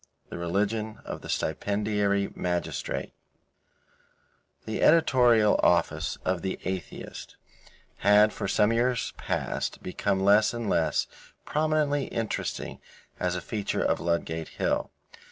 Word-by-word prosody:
THE - - -6
RELIGION 105 +5 -1
OF - - -6
THE - - -10
STIPENDIARY 100 -1 0
MAGISTRATE 90 -1 -3 1.5
The 110 - -3
editorial 125 -9 +5
office - - +2
of 90 -2 0
The 95 +1 -3
Atheist 95 -5 -6 0.6
had 105 +2 +5
for 100 - -3
some 105 +3 +3
years 120 +1 0
past - - -3
become 95 +1 -1
less 105 +4 +4
and 115 -2 -3
less 80 -5 +1 0.4
prominently 150 -2 +1
interesting 115 -1 -3 0.4
as 90 0 0
a 90 - -3
feature 105 +3 -2
of - - +1
Ludgate 80 -1 -1
Hill. - - 0
105 Hz, 115 wpm, -27 LUFS, 95-115 Hz, 1.5 s, editorial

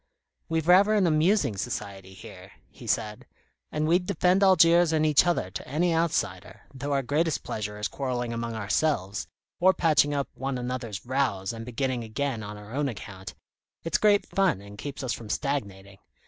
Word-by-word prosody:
"We've 160 -1 -1
rather 200 +4 +6
an 200 -3 +3
amusing 155 - +2
society 95 -1 -5
here," - - -12 0.2
he - - -12
said. 105 +4 -2 0.4
"And 155 0 -1
we'd 180 +2 +2
defend 180 +3 +2
Algiers 175 -3 +5
and 155 -1 +2
each 155 +2 +4
other 170 - 0
to - - -7
any 165 +6 +1
outsider, 105 - -1
though 140 +2 -5
our 140 -1 +1
greatest 150 +4 0
pleasure 105 -1 -4
is 105 - -2
quarrelling 125 -3 -3
among 115 0 -4
ourselves, 105 -1 -1 0.3
or 185 +1 +5
patching 150 -3 +3
up 140 -1 -2
one 135 -1 -3
another's 125 -4 -5
rows 120 -7 -1
and 115 0 -8
beginning 125 0 -2
again 115 +2 -3
on 105 0 -7
our 105 +2 -11
own 140 0 0
account. 95 -4 -9 0.5
It's 165 - 0
great 205 -1 +4
fun 195 - +1
and 100 0 -12
keeps 140 +6 -6
us 125 - -1
from 110 -3 -8
stagnating. 100 -9 -3
135 Hz, 175 wpm, -27 LUFS, 105-160 Hz, 0.5 s, rather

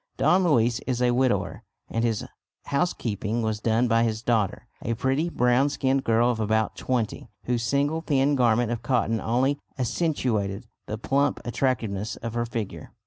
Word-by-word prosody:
Don 185 +1 +4
Luis 120 -7 +3
is 125 -2 0
a 125 -1 +3
widower 120 -7 0 0.3
and 115 - -2
his 115 -3 0 0.4
housekeeping 115 - -1
was 110 -1 -1
done 115 +2 +2
by 115 0 +3
his 110 -1 -1
daughter, 110 -6 0
a 115 - -2
pretty 135 +8 0
brown 125 0 +3
skinned 135 -1 0
girl 115 +2 +3
of 115 - -4
about 110 0 +1
twenty, 120 -3 -2
whose 120 -1 -1
single 140 +7 0
thin 145 -2 +2
garment 120 -2 +2
of 120 - -3
cotton 115 -3 0
only 130 +5 +1 0.2
accentuated 120 - -1 0.2
the 110 - -3
plump 140 +5 +1
attractiveness 115 -5 -1
of 115 -1 -6
her 120 0 -1
figure. 115 -4 -5
120 Hz, 160 wpm, -25 LUFS, 110-130 Hz, 0.4 s, Don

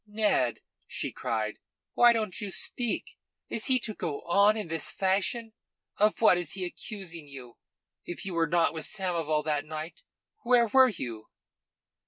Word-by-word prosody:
"Ned!" 210 - +1 0.3
she - - -4
cried. 110 -1 -3 0.3
"Why 240 0 +7
don't 220 -3 -2
you 205 - -4
speak? 235 +4 -1 0.3
Is 220 - -1
he 260 - +4
to 220 - -3
go 145 -7 -4
on 200 +5 +4
in 210 - -4
this 165 0 -1
fashion? 200 +4 0 0.4
Of 210 +2 +2
what 185 -5 +6
is 175 -4 -4
he 190 -1 -3
accusing 175 -4 -7
you? 130 -4 -11 0.4
If 175 - -6
you 190 - -4
were 165 -1 +2
not 170 +1 +2
with 160 -1 -3
Samoval 165 -6 -1
that 150 -2 0
night, 155 +2 -7 0.4
where 240 -1 +4
were 260 +3 +6
you?" 120 - -6
180 Hz, 160 wpm, -29 LUFS, 155-215 Hz, 0.4 s, Why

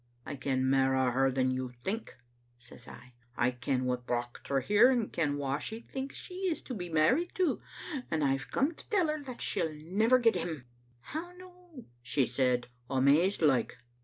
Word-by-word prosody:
"'I 145 - -5
ken 130 0 0
mairo' 130 -1 +3
her 135 +2 +2
than 130 0 +1
you 130 -1 -3
think,' 220 +4 -4 0.4
says 125 0 -14
I; 125 0 -13 0.2
'I 125 - +3
ken 125 +1 -1
what 125 -1 -2
brocht 120 0 -3
her 140 -1 +2
here, 210 - +5
and 240 -5 0
ken 145 -4 0
wha 140 0 -1
she 225 +6 -5
thinks 265 +3 -6
she - - -7 0.2
is 320 - -1
to 255 - -6
be 180 -6 -5
married 245 - +2
to, 365 -5 +1 0.5
and 155 -2 0
I've 135 0 0
come 280 +5 +1
to - - -13
tell 380 -8 +2
her 305 0 -2
that 255 -3 -8
she'll 160 - 0
never 200 +11 +3
get 235 -2 +4
him. 165 -7 -4 0.2
' 120 0 -34
"'How 330 - -6
no?' 360 -6 -14 0.2
she 130 +2 +1
said, 125 0 +1 0.2
amazed 145 +8 +3
like. 125 -7 +2
145 Hz, 190 wpm, -31 LUFS, -, 0.5 s, here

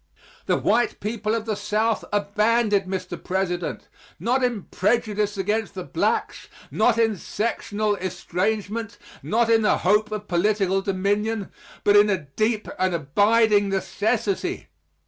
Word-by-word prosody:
The - - +2
white 235 +4 +1
people 215 +1 -2
of 225 -1 -3
the 220 - -1
South 210 +2 0
are 205 -1 +1
banded, 215 -2 +3
Mr. 185 -1 -5
President, 180 -1 -2 0.3
not 255 +2 +1
in 240 -6 0
prejudice 210 0 0
against 210 +3 -1
the - - -4
blacks - - -1 0.2
not 235 -2 +2
in 225 -2 +2
sectional 215 0 -2
estrangement 205 +5 -3 0.2
not 230 +1 +1
in 225 -1 +4
the 210 - +3
hope 210 +3 +2
of 210 -1 -5
political 195 +1 +1
dominion 200 +2 -1 0.3
but 205 - +4
in 205 0 +6
a 195 - +2
deep 215 +9 -2
and 185 -1 +1
abiding 205 +7 +3
necessity. 205 +1 -1
210 Hz, 135 wpm, -24 LUFS, 195-220 Hz, 0.3 s, in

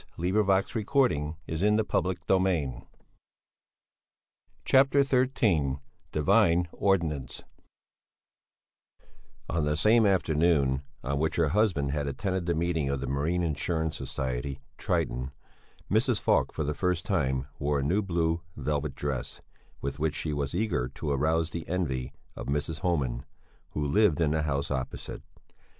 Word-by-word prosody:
the 90 +2 -1
district 105 0 +2
marshal 100 +3 +1
closed 85 - +1
the 110 - +2
proceedings. 90 - 0 1.8
CHAPTER 135 +1 +5
XIII 115 - +2 0.3
DIVINE 90 +2 +3
ORDINANCE 80 -10 -1 2.0
On 85 -2 0
the 75 0 0
same 110 +4 +5
afternoon 80 -7 +2 0.2
on 70 +1 -1
which 80 +1 0
her 80 -3 +2
husband 85 -7 +1
had 75 0 -1
attended 90 +5 -2
the 85 - +1
meeting 80 -3 0
of 70 -1 -1
the 70 - -3
Marine 75 +7 0
Insurance 80 0 -1
Society 65 0 -3 0.2
"Triton," 65 +2 -1 0.6
Mrs. - - +2
Falk - - +2
for 80 - -3
the 75 +1 -1
first 90 +2 -1
time 65 -8 0
wore 70 0 +1
a - - -2
new 90 +9 +2
blue 85 -3 0 0.2
velvet 75 -2 -2
dress, 70 -3 -4 0.4
with 70 +2 -4
which 75 -1 0
she 75 0 -2
was 70 +1 -2
eager 95 - 0
to 75 - -3
arouse 80 +3 +1
the 85 +1 -5
envy 70 -8 -2 0.2
of - - -7
Mrs. 75 +2 -2
Homan, 70 -9 -1 0.5
who 75 - -1
lived 85 +3 +3
in 80 -3 +2
the 80 0 +1
house 70 -2 -1
opposite. 65 -2 -4
80 Hz, 135 wpm, -28 LUFS, 70-90 Hz, 2.0 s, CHAPTER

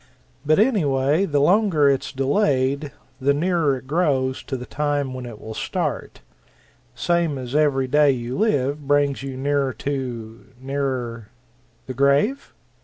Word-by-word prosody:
But 155 +1 +3
anyway, 155 - +2
the 145 -5 0
longer 175 -2 +3
it's 135 -1 +1
delayed, 140 -1 0 0.3
the 140 +1 +2
nearer 165 -4 +1
it 130 - -12
grows 135 -4 0
to 135 - -3
the 125 - -7
time 145 -2 -2
when 130 -1 -6
it 115 -3 -10
will 110 - -8
start - - -3 0.7
same 170 0 0
as 125 -1 -6
every 145 -3 +2
day 150 +2 +4
you 125 -1 -2
live 145 - 0
brings 145 -1 +2
you 135 -1 -6
nearer 140 -1 0
to 120 -4 -5
nearer 130 -5 -3 0.3
" 120 -1 -37
"The 130 - -5
grave?" 140 - +1
140 Hz, 145 wpm, -22 LUFS, 130-150 Hz, 0.7 s, day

